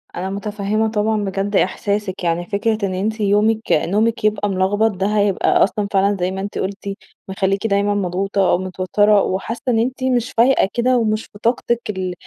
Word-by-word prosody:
أنا 185 +2 -3
متفهمة 210 +2 -2
طبعًا 210 0 0
بجد 195 +1 -2
إحساسِك، 200 0 -1
يعني 170 +1 0
فكرة 215 +1 -1
إن 185 - -3
أنتِ 215 +4 -2
يومِك 210 +2 +2
نومِك 215 +8 +1
يبقى 210 -1 +1
ملخبط 200 +4 +1
ده 195 0 -2
هيبقى 200 -2 +3
أصلًا 200 +1 -1
فعلًا 200 +1 +2
زي 180 +1 0
ما 190 0 -4
أنتِ 205 - -5
قُلتِ 200 +1 -4 0.4
مخلّيكِ 195 +2 0
دايمًا 200 0 +1
مضغوطة 195 0 0
أو - - +3
متوتّرة، 190 +3 +2
وحاسّة 195 +5 -3
إن 225 - +2
أنتِ 255 +3 -2
مش 245 -2 0
فايقة 235 -4 +3
كده 250 +1 +2
ومش 215 -2 -1
بطاقتِك 235 +2 0
ال 185 -3 -3
205 Hz, 170 wpm, -19 LUFS, 190-220 Hz, 0.4 s, هيبقى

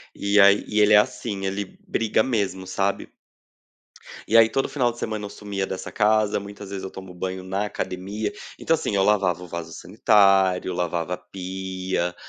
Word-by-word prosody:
E 100 +1 +2
aí, 100 +1 +5
e 105 0 +1
ele 105 0 +5
é - - +9
assim, 105 -1 0
ele 95 0 -4
briga 110 -1 +1
mesmo, 100 -6 -1
sabe. 95 +1 -1 1.2
E 115 - +4
aí 115 0 +7
todo 135 +4 -1
final 125 -4 +1
de 120 - -13
semana 110 -2 -3
eu - - -6
sumia 100 -2 -4
dessa 95 - -6
casa, 105 -1 +2
muitas 100 0 -10
vezes 100 -1 -5
eu 95 - -6
tomo 95 -1 -10
banho 95 +1 -5
na 95 +2 -2
academia. 100 +2 -4 0.3
Então 165 - +1
assim, 150 -9 -1
eu 95 - +3
lavava 95 -4 +2
o - - -9
vaso 85 -1 -6
sanitário, 95 -3 +3
lavava 85 0 -2
a - - -17
pia, 95 -1 -4
100 Hz, 180 wpm, -24 LUFS, 95-105 Hz, 1.2 s, é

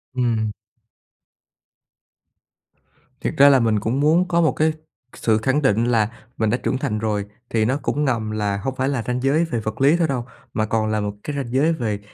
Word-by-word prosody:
Ừm. 115 -4 0 2.7
Thiệt - - -2
ra 140 +1 +8
là 135 -2 +5
mình 110 -3 +2
cũng 115 +6 -1
muốn 160 +5 +3
có 170 -1 +2
một 160 - +3
cái 155 0 +1 0.4
sự 110 -2 +1
khẳng 130 +6 +1
định 115 -4 +2
là 115 -3 +2 0.3
mình 110 - +1
đã 120 - +1
trưởng 130 - -1
thành 110 -4 -2
rồi, 105 -2 -1 0.2
thì 110 -1 +1
nó 130 +5 +1
cũng 150 +1 -1
ngầm 115 -5 -1
là 105 -2 -1
hông 130 +6 -4
phải 130 +1 0
là 135 -5 -1
ranh 125 0 -1
giới 145 +5 +2
về 125 -8 -2
vật 110 +2 -5
lý 145 +5 +5
thôi 170 -2 +2
đâu, 125 -4 -2 0.3
mà 110 - 0
còn 110 0 0
là 110 - 0
một 105 0 -3
cái 150 - -4
ranh 130 -4 -4
giới 150 +5 +3
về 110 -9 -2
120 Hz, 210 wpm, -21 LUFS, 110-140 Hz, 2.7 s, ra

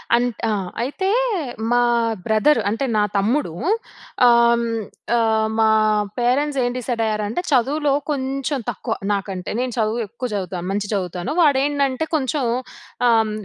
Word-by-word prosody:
అం‌త్ 240 -2 -1
ఆహ్, 195 -4 -2
అయితే 380 +10 -2 0.6
మా 245 0 +4 0.4
బ్రదర్ 220 +8 +3
అంటే 225 +6 -1
నా 210 - +3
తమ్ముడు 225 - +1 0.8
ఆహ్, 235 0 +5 0.5
ఆహ్, 220 -1 +2
మా 220 - +5 0.5
పేరెంట్స్ 275 +4 +1
ఏం 245 - 0
డిసైడ్ 245 -2 -2
అయ్యారంటే, 215 +6 -1
చదువులో 280 +3 +2 0.2
కొంచెం 275 +1 -2
తక్కువ 225 - -3 0.2
నాకంటే. 195 -2 -4
నేను 255 0 -1
చదువు 220 +1 0
ఎక్కువ 235 +4 -5
చదువుతాను, 180 -2 -4
మంచి‌గా 205 0 -2
చదువుతాను. 180 - -3
వాడు 290 -5 +5
ఏంటంటే, 280 0 0
కొంచెం 280 -1 0 0.6
ఆహ్, 225 -2 +3
235 Hz, 130 wpm, -21 LUFS, 215-275 Hz, 0.8 s, ఆహ్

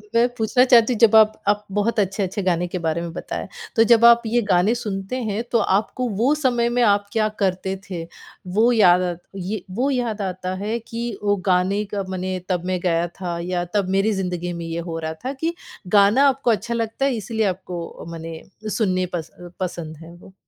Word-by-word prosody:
मैं 235 +1 +5
पूछना 225 +3 +3
चाहती 245 -1 +5
हूँ, 220 - -4
जब 225 -2 +6
आप 215 0 +5
आप 210 0 +1
बहुत 220 +1 +1
अच्छे-अच्छे 195 0 -1
गाने 175 -1 +1
के 180 +1 -4
बारे 165 0 -1
में 170 -1 -5
बताया। - - -5 0.3
तो 225 - +6
जब 235 0 +6
आप 235 0 +8
ये 240 +2 +2
गाने 185 +6 +3
सुनते 205 -1 -4
हैं, 210 +3 -2
तो 235 - +3 0.2
आपको 235 +5 -1
वो 260 +6 +4
समय 245 -5 +1
में 245 +1 +1
आप 205 -2 +3
क्या 215 -1 +2
करते 190 -1 0
थे? 170 -3 -4 0.4
वो 220 +7 +3
याद 185 -6 +5
आत 175 -1 -3
ये 195 +2 -4 0.2
वो 270 +3 +2
याद 235 -5 -1
आता 185 -1 -3
है 210 +4 -2
कि 230 -1 -5
वो 205 0 +3
गाने 185 +3 +2
का, 200 0 -4
मने 185 0 -3
तब 180 -1 -1
मैं 185 0 -1
गया 170 -1 +1
था, 175 0 -5
या 175 0 -2
तब 200 -3 +1
मेरी 205 +3 +2
ज़िंदगी 175 -1 -3
में 170 -1 -6
ये 165 0 -4
हो 165 - -3
रहा 160 0 -4
था 265 - -2
कि 330 +1 0 0.4
गाना 210 +8 +5
आपको 265 -2 +1
अच्छा 230 +2 -1
लगता 230 +3 -1
है, 275 - +2
इसलिए 220 0 -2
आपको 180 -3 -5
मने 165 -1 -7 0.4
सुनने 185 -4 +1
पस 165 -1 -5 0.3
पसंद 170 -4 -5
है 165 +1 -12
वो? 185 +2 -16
200 Hz, 205 wpm, -22 LUFS, 180-230 Hz, 0.4 s, आप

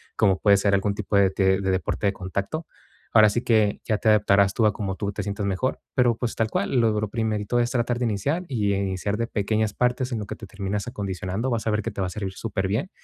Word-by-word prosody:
como 95 -4 +3
puede 100 -1 +5
ser 100 0 +1
algún 100 +1 +1
tipo 105 0 -1
de 100 -1 +5
te 95 0 +2
de 95 -1 0
deporte 95 +2 -1
de 100 - +1
contacto. 100 - -4 0.5
Ahora 110 -1 +7
sí 120 +4 -1
que 110 -3 +2
ya 110 - +1
te - - -2
adaptarás 100 -2 +4
tú 115 - +3
a 105 - +5
cómo 95 -3 -3
tú 100 0 -3
te - - -4
sientas 100 0 -3
mejor, 100 +7 -1
pero, 120 -2 +3
pues, 120 -2 -3
tal 110 -1 0
cual, 105 +6 0
lo 110 -2 +2
lo 105 -1 -2
primerito 110 +1 -1
es 120 - +1
tratar 120 -1 0
de 125 - 0
iniciar 140 - -1
y 105 -7 0
iniciar 100 +1 -2
de 115 +1 -1
pequeñas 110 0 0
partes 125 +1 0
en 115 - -1
lo 105 - -4
que - - -5
te 110 - -10
terminas 100 +2 -4
acondicionando, 100 +2 -3
vas 115 -2 -2
a 110 - +2
ver 105 - +1
que - - -3
te - - -5
va 95 - 0
a - - -4
servir 95 0 -5
superbién, 105 - -2
105 Hz, 255 wpm, -24 LUFS, 100-115 Hz, 0.5 s, Ahora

